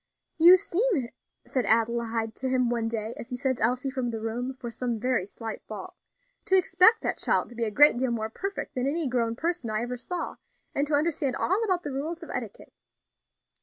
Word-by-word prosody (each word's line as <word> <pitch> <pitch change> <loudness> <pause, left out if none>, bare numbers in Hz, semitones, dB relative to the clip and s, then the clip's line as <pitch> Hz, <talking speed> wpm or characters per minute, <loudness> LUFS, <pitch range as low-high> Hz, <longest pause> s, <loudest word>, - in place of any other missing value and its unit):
"You 350 +3 +9
seem," 360 - 0 0.4
said 255 -3 -1
Adelaide 230 0 +1
to 260 - -2
him 255 -2 +2
one 230 -2 0
day, 225 0 -3
as 235 - -8
he 250 - -4
sent 260 0 -1
Elsie 250 +4 +1
from 260 -3 -2
the 225 -1 -4
room 240 +4 -3
for 250 -2 -7
some 240 -1 -2
very 245 -5 0
slight 225 +1 -7
fault, - - -7 0.5
"to 380 - +4
expect 370 +4 +5
that - - -1
child - - +1
to 240 - -13
be 230 0 -1
a - - 0
great 265 +3 +6
deal 260 0 +1
more 220 -2 -2
perfect 390 - -5
than 255 +1 -1
any 310 +1 0
grown 235 -2 0
person 335 -3 -2
I 215 +1 -1
ever 250 +1 -4
saw, 345 +7 -4 0.4
and 285 +1 0
to 295 - +2
understand 290 -4 +1
all 385 +10 +1
about 370 -5 0
the 290 - -4
rules 320 +6 -4
of - - -8
etiquette." 230 -5 -6
250 Hz, 205 wpm, -27 LUFS, 230-305 Hz, 0.5 s, You